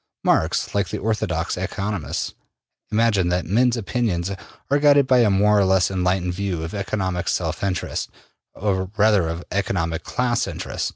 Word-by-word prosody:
Marx, -, -, +1 dB
like 100 Hz, -4 st, 0 dB
the -, -, -3 dB
orthodox 110 Hz, +1 st, -1 dB
economists, 100 Hz, -4 st, -3 dB, 0.6 s
imagined 105 Hz, -5 st, +2 dB
that 90 Hz, -2 st, 0 dB
men's 120 Hz, +6 st, +2 dB
opinions 100 Hz, -5 st, -1 dB, 0.4 s
are 145 Hz, -, +4 dB
guided 145 Hz, -1 st, +5 dB
by 130 Hz, -1 st, +4 dB
a 115 Hz, -3 st, +4 dB
more 105 Hz, +1 st, +4 dB
or -, -, +4 dB
less 95 Hz, -1 st, +3 dB
enlightened 90 Hz, -1 st, 0 dB
view 90 Hz, -3 st, -3 dB
of 80 Hz, -, -6 dB
economic 95 Hz, -3 st, -2 dB
self -, -, -2 dB
interest, 95 Hz, -2 st, -2 dB, 0.5 s
or 95 Hz, -2 st, -1 dB
rather 105 Hz, -4 st, +4 dB
of 85 Hz, +2 st, -4 dB
economic 85 Hz, -4 st, -1 dB
class 120 Hz, -2 st, 0 dB
interest. -, -, -3 dB
100 Hz, 155 wpm, -22 LUFS, 90-110 Hz, 0.6 s, guided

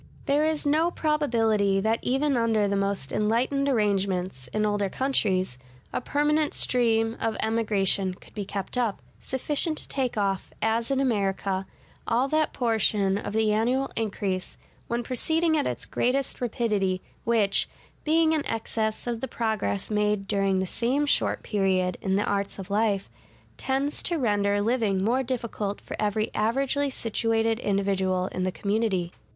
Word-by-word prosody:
There 295 Hz, +2 st, +3 dB
is 315 Hz, -2 st, -1 dB
no 310 Hz, +4 st, +3 dB
probability 225 Hz, -, +1 dB
that 220 Hz, +3 st, +1 dB
even 270 Hz, +2 st, +1 dB
under 225 Hz, -3 st, +2 dB
the 200 Hz, -, 0 dB
most 195 Hz, -8 st, -1 dB
enlightened 245 Hz, +6 st, +1 dB
arrangements 190 Hz, -, 0 dB
(in 215 Hz, 0 st, 0 dB
older 205 Hz, -1 st, 0 dB
countries) 190 Hz, -, 0 dB, 0.3 s
a -, -, -1 dB
permanent 295 Hz, +3 st, +1 dB
stream 225 Hz, -2 st, +2 dB
of 225 Hz, -1 st, -1 dB
emigration 205 Hz, -4 st, +1 dB
could -, -, -18 dB
be 210 Hz, -, -3 dB
kept 200 Hz, +5 st, -4 dB
up, 230 Hz, -5 st, 0 dB, 0.2 s
sufficient 295 Hz, +4 st, 0 dB
to -, -, -6 dB
take 255 Hz, -5 st, -2 dB
off, 195 Hz, -2 st, 0 dB
as 225 Hz, +1 st, 0 dB
in 270 Hz, -1 st, +1 dB
America, 195 Hz, -6 st, 0 dB, 0.4 s
all 245 Hz, +4 st, +2 dB
that 310 Hz, 0 st, +2 dB
portion 215 Hz, -4 st, +2 dB
of 205 Hz, -, -5 dB
the 220 Hz, -1 st, +2 dB
annual 250 Hz, +5 st, +1 dB
increase 195 Hz, -4 st, -2 dB, 0.3 s
(when 235 Hz, +1 st, -1 dB
proceeding 320 Hz, +7 st, +1 dB
at 295 Hz, -, +1 dB
its -, -, -3 dB
greatest 260 Hz, +2 st, -1 dB
rapidity) 210 Hz, -6 st, 0 dB, 0.2 s
which, 220 Hz, -3 st, +2 dB, 0.3 s
being 320 Hz, +1 st, +3 dB
in 310 Hz, -2 st, +1 dB
excess 220 Hz, -1 st, -2 dB
of 235 Hz, -2 st, -3 dB
the 265 Hz, -, -2 dB
progress 215 Hz, -, -1 dB
made 210 Hz, -1 st, +1 dB
during 195 Hz, -2 st, +1 dB
the 190 Hz, -, 0 dB
same 250 Hz, +9 st, 0 dB
short 290 Hz, -, +1 dB
period 190 Hz, -3 st, +1 dB
in 190 Hz, 0 st, 0 dB
the 205 Hz, -, +2 dB
arts 200 Hz, -1 st, -1 dB
of 195 Hz, 0 st, -8 dB
life, 205 Hz, -2 st, +1 dB, 0.5 s
tends 275 Hz, +2 st, -1 dB
to 345 Hz, -, -1 dB
render 205 Hz, -5 st, +1 dB
living 215 Hz, -5 st, +1 dB
more 245 Hz, +5 st, +2 dB
difficult 235 Hz, -5 st, -3 dB
for -, -, -7 dB
every 215 Hz, +1 st, 0 dB
averagely 275 Hz, +5 st, +1 dB
situated 225 Hz, -1 st, 0 dB
individual 195 Hz, -3 st, 0 dB
in 185 Hz, -, -3 dB
the 185 Hz, 0 st, 0 dB
community. 200 Hz, -3 st, -1 dB
220 Hz, 155 wpm, -26 LUFS, 200-255 Hz, 0.5 s, There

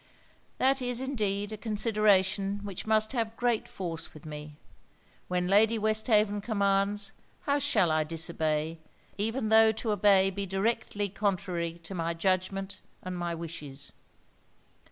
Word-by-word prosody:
'That 270 Hz, +1 st, +2 dB
is 245 Hz, -1 st, 0 dB
indeed 210 Hz, -6 st, -1 dB
a 215 Hz, -, -5 dB
consideration 205 Hz, -2 st, +2 dB
which 200 Hz, 0 st, -6 dB
must 215 Hz, 0 st, +3 dB
have 225 Hz, -3 st, -2 dB
great 240 Hz, -2 st, 0 dB
force 165 Hz, -4 st, -5 dB
with 155 Hz, -, -13 dB
me. 150 Hz, -1 st, -8 dB, 0.7 s
When 180 Hz, 0 st, 0 dB
Lady 215 Hz, +4 st, +4 dB
Westhaven 215 Hz, -1 st, +2 dB
commands, 200 Hz, -1 st, +1 dB, 0.3 s
how 285 Hz, 0 st, +1 dB
shall 215 Hz, -, +2 dB
I 155 Hz, 0 st, +2 dB
disobey, 160 Hz, 0 st, -1 dB, 0.4 s
even 225 Hz, +2 st, -1 dB
tho' 220 Hz, 0 st, +7 dB
to 220 Hz, 0 st, -2 dB
obey 195 Hz, -1 st, +4 dB
be 200 Hz, +1 st, -4 dB
directly 205 Hz, +1 st, -1 dB
contrary 180 Hz, -4 st, -2 dB
to 165 Hz, -, -8 dB
my 170 Hz, -1 st, -2 dB
judgment 190 Hz, +3 st, -1 dB, 0.2 s
and 185 Hz, 0 st, -5 dB
my 175 Hz, -1 st, -3 dB
wishes.' 150 Hz, -4 st, -7 dB
200 Hz, 135 wpm, -29 LUFS, 175-220 Hz, 0.7 s, tho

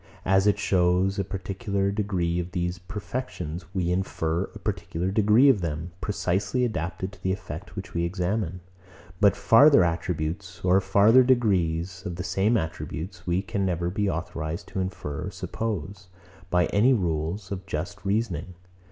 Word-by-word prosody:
As 95 Hz, +2 st, +4 dB
it 105 Hz, -, +4 dB
shews 95 Hz, 0 st, +2 dB
a -, -, +2 dB
particular 100 Hz, +1 st, -2 dB
degree 95 Hz, -5 st, -1 dB
of 90 Hz, 0 st, -5 dB
these 90 Hz, -1 st, -2 dB
perfections, 90 Hz, -4 st, -5 dB
we 90 Hz, -3 st, -1 dB
infer 90 Hz, -1 st, -1 dB
a -, -, -12 dB
particular 90 Hz, +3 st, -3 dB
degree 110 Hz, +6 st, +5 dB
of 125 Hz, -8 st, +5 dB
them, 80 Hz, +1 st, -3 dB
precisely 100 Hz, +4 st, 0 dB
adapted 95 Hz, -3 st, -3 dB
to 100 Hz, -, -17 dB
the 95 Hz, -, 0 dB
effect 95 Hz, -, -6 dB
which -, -, -7 dB
we 85 Hz, -, 0 dB
examine. 90 Hz, +1 st, -2 dB, 0.6 s
But 100 Hz, -2 st, +5 dB
farther 125 Hz, -2 st, +6 dB
attributes 85 Hz, +2 st, -2 dB
or 95 Hz, +2 st, +5 dB
farther 100 Hz, +6 st, +6 dB
degrees 95 Hz, -8 st, +1 dB
of 90 Hz, -4 st, -4 dB
the 90 Hz, -, -4 dB
same 95 Hz, +5 st, +2 dB
attributes, 80 Hz, +2 st, -5 dB
we 90 Hz, +2 st, +1 dB
can 100 Hz, -1 st, -2 dB
never 90 Hz, -2 st, 0 dB
be 100 Hz, +1 st, 0 dB
authorised 80 Hz, -1 st, -4 dB
to -, -, -4 dB
infer 90 Hz, -6 st, -4 dB
or -, -, -3 dB
suppose, 100 Hz, -4 st, -4 dB, 0.4 s
by 90 Hz, 0 st, +3 dB
any 120 Hz, +6 st, +5 dB
rules 85 Hz, 0 st, -2 dB
of 95 Hz, -1 st, -5 dB
just 90 Hz, +5 st, -4 dB
reasoning. 95 Hz, -4 st, -1 dB
95 Hz, 155 wpm, -26 LUFS, 85-100 Hz, 0.6 s, farther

